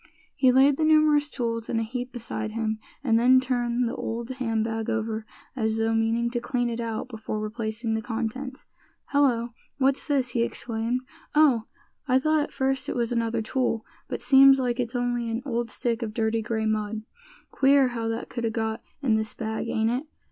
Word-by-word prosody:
He 260 -2 +5
laid 270 +2 +5
the 320 - +1
numerous 305 -1 +4
tools 230 -4 -3
in 230 - 0
a - - 0
heap 245 +2 -5
beside 220 -3 -4
him, 220 -1 -1 0.2
and 230 -4 +3
then 255 +2 +6
turned 245 -1 0
the 230 - -3
old 235 +2 -4
hand 225 -4 -1
bag 225 0 -3
over, 220 -1 -2 0.3
as 220 -3 0
though 225 0 +1
meaning 225 +1 +1
to 240 - -1
clean 245 0 -1
it 230 - -4
out 225 -1 -3
before 220 -3 -5
replacing 220 +1 -2
the 220 - -1
contents. 240 +4 -4 0.4
"Hello! 250 -5 +2 0.3
what's 270 0 +1
this?" 275 -4 +1
he 240 -1 0
exclaimed; 235 +1 -1 0.3
"Oh! 270 -8 +5 0.4
I 255 -1 +4
thought 310 +3 +2
at 290 - -3
first 270 0 -1
it - - -2
was 235 -1 0
another 230 -1 0
tool; 230 -1 -1 0.2
but - - -4
seems 270 -1 +7
like 245 -2 -1
it's 245 0 -2
only 245 -1 -1
an 230 +2 -3
old 235 -3 -2
stick 235 +1 -2
of 215 -2 -4
dirty 225 0 +1
gray 220 0 -2
mud. 215 0 -1 0.5
Queer 270 -1 +4
how 230 -2 -3
that 225 +1 -3
could 235 - -5
a - - +1
got 220 0 -2 0.2
in 245 -5 +3
this 220 0 0
bag, 220 0 -3
ain't 220 +1 +1
it? 260 +6 -2
235 Hz, 195 wpm, -26 LUFS, 225-255 Hz, 0.5 s, seems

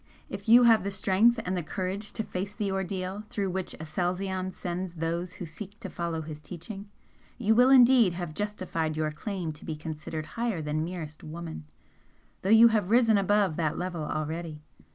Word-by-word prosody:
If - - -6
you 240 +2 +9
have 225 -2 +6
the 195 - -2
strength 200 +4 +3
and 185 +1 -1
the 180 - -1
courage 190 +5 -4
to 220 - -2
face 195 +1 -5
the 205 -3 -1
ordeal 190 +1 -3
through 195 -3 -2
which 190 0 -3
Aselzion 185 +3 -2
sends 180 0 -4
those 170 +2 -2
who 180 - -7
seek 195 +6 -9
to 195 - -7
follow 170 -2 -3
his 155 -1 -8
teaching, 195 +5 -8 0.5
you 220 -3 +3
will 245 +3 +6
indeed 245 -6 +7
have 175 -3 -5
justified 180 -6 -2
your 155 -1 0
claim 175 0 -4
to 150 - -12
be 160 - -4
considered 155 0 -5 0.2
higher 230 -7 0
than 155 0 -1
merest 165 -3 -6
woman, 160 - -7 0.8
though 190 - -2
you 225 +2 +8
have 210 -4 +1
risen 225 -2 +5
above 200 -4 +2
that 155 -3 0
level 180 -2 -3
already. 155 0 -4
185 Hz, 180 wpm, -28 LUFS, 160-205 Hz, 0.8 s, you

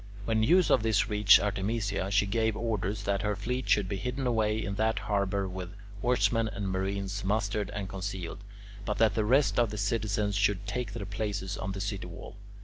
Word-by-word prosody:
When 110 -1 +1
news 170 +10 +4
of - - +5
this 110 -1 +1
reached 105 0 +7
Artemisia, 100 -1 -1
she 100 0 +3
gave 110 +1 0
orders 105 -3 -2
that 100 -2 0
her 105 0 0
fleet 125 +6 -3
should 105 -3 +3
be 100 - -3
hidden 125 +6 -3
away 110 -3 +1
in 100 - -3
that 110 +2 +1
harbour 100 -3 0
with 90 -1 -7 0.3
oarsmen 120 -2 +2
and 100 -2 -4
marines 95 +1 -2
mustered 105 +1 0
and 100 -1 -4
concealed, 95 -2 -5 0.4
but 105 +1 -2
that 110 -3 +4
the 110 - 0
rest 120 -2 +3
of 120 -2 +3
the 105 - -6
citizens 105 0 0
should 100 0 +1
take 120 -3 -3
their 105 -3 -5
places 100 -1 -3
on 95 +1 -4
the 100 - -5
city 100 -3 -3
wall. 85 - -10
105 Hz, 195 wpm, -29 LUFS, 100-110 Hz, 0.4 s, reached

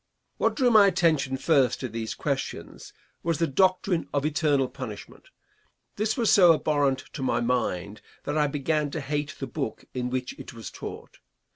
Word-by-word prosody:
What - - +1
drew 255 -4 +3
my 210 -3 +7
attention 155 -8 +2
first 135 -3 +2
to 130 - -2
these 115 -1 -5
questions - - -4 0.3
was 165 -2 0
the 165 - +2
doctrine 185 +2 +1
of 140 0 +1
eternal 145 -3 +2
punishment. - - -9 0.7
This 215 +3 -1
was 230 -3 +3
so 175 -4 +7
abhorrent 145 -4 +1
to 145 - -6
my 130 - +1
mind 110 -5 -1 0.2
that 145 - -3
I 150 -1 +3
began 150 +1 -1
to 160 - -2
hate 145 0 -3
the 135 - -3
book 120 -3 -5
in 125 -1 -2
which 130 0 -3
it - - -9
was 115 - -8
taught. - - -9
145 Hz, 170 wpm, -26 LUFS, 130-165 Hz, 0.7 s, my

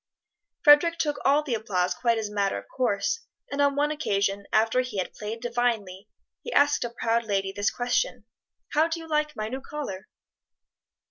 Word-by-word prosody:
Frederic 325 +3 +7
took 295 -3 -1
all 285 +2 +4
the 275 -5 -3
applause 185 -5 0
quite 235 +4 +1
as 220 -1 -2
a - - -11
matter 200 -1 0
of - - -9
course, 245 - 0 0.3
and 280 0 0
on 285 -1 +3
one 295 +1 +1
occasion, 200 -8 -1
after 225 +3 +3
he 250 -5 -6
had 185 - -2
played 215 +2 -6
divinely, 230 -5 -1 0.3
he 480 - -7
asked 290 0 +4
a 240 - -3
proud 230 0 0
lady 195 -3 -1
this 205 +1 0
question, 375 - -1 0.4
"How 310 +2 +3
do 335 0 -3
you 325 - -9
like 300 -1 0
my 215 -1 -3
new 260 +4 -5
collar?" 260 -11 -6
235 Hz, 185 wpm, -26 LUFS, 205-295 Hz, 0.4 s, Frederic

